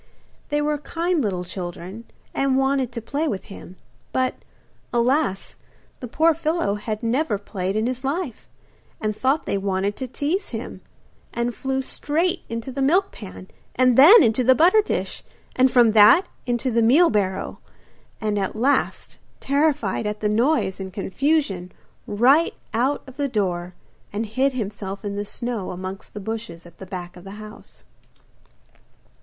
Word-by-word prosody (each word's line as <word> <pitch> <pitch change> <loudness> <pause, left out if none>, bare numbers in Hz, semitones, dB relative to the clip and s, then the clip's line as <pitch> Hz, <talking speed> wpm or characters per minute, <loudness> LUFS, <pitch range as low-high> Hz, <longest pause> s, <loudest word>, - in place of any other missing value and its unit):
They 295 0 0
were 300 0 0
kind 335 +2 -1
little 190 -6 -1
children, 180 +4 -7 0.3
and 275 -1 +1
wanted 270 -2 +1
to 230 - -5
play 290 +7 -1
with 195 -8 -3
him; 185 - -11 0.4
but, 255 0 +1 0.6
alas! 240 -3 0 0.4
the 250 - -6
poor 320 +7 +3
fellow 315 -8 0
had 210 +1 -4
never 230 -1 +1
played 195 -1 -4
in 215 +1 +1
his 255 +1 -3
life, 275 -2 -3 0.5
and 215 -1 -2
thought 270 +7 +1
they 200 - -1
wanted 195 +1 -1
to 260 - -4
tease 300 - -2
him, - - -6 0.5
and 235 0 -2
flew 265 +2 -2
straight 335 +7 -1
into 230 +3 -4
the 275 +2 -4
milk 360 +9 +3
pan, 95 0 -10 0.3
and 255 -1 +4
then 315 - +9
into 230 +1 +2
the 260 +2 +5
butter 360 - +5
dish, 415 - -3 0.3
and 260 +1 +5
from 240 -3 +5
that 215 - +7 0.2
into 245 +1 0
the 230 0 +2
meal 290 +10 +5
barrel, 195 -3 -1 0.6
and 210 -1 -1
at 195 +1 -2
last, 265 +6 0 0.2
terrified 280 -8 +1
at 210 0 -3
the 210 - 0
noise 225 -2 +1
and 190 -1 -6
confusion, 200 - 0 0.4
right 260 +10 +3 0.2
out 255 +6 +1
of 265 -1 -13
the 285 -1 0
door, 180 -6 -2 0.4
and 210 +3 -2
hid 260 +6 +1
himself 200 -3 -5
in 200 0 -3
the 205 - -2
snow 235 -2 -4
amongst 185 +3 -7
the - - -4
bushes 220 -4 -6
at 170 -1 -16
the 190 - -9
back 180 -1 -7
of 180 - -12
the 195 0 -9
house. 215 +1 -12
235 Hz, 160 wpm, -23 LUFS, 200-275 Hz, 0.6 s, then